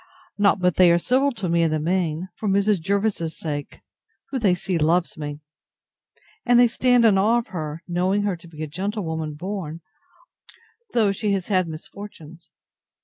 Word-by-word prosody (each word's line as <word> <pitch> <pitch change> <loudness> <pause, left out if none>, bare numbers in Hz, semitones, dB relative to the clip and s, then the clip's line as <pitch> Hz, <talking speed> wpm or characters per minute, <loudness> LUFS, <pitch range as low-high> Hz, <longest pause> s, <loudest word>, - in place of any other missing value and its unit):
Not 200 -1 +4
but 180 -2 +1
they 180 -2 +7
are 170 - +5
civil 260 +10 +2
to 200 -5 -4
me 170 0 +2
in 165 - +3
the 155 0 0
main, 170 +1 -1
for 215 - -3
Mrs. 200 -1 +2
Jervis's 195 -3 -1
sake, 145 -3 -5 0.5
who 265 - -1
they 195 -6 +3
see 180 -1 -2
loves 170 +6 +1
me; 150 -2 -6 1.0
and 245 -1 +4
they 245 - +7
stand 245 0 +3
in 200 -4 +5
awe 220 +5 +3
of 235 - -3
her, 155 -2 -5
knowing 185 +3 +1
her 200 -3 0
to 170 0 -15
be 155 -2 -8
a - - -3
gentlewoman 160 -3 -3
born, 170 -2 -5 1.1
though 215 -4 +3
she 200 +1 -1
has 195 0 -3
had 185 -3 +2
misfortunes. 165 0 -10
185 Hz, 175 wpm, -23 LUFS, 165-205 Hz, 1.1 s, they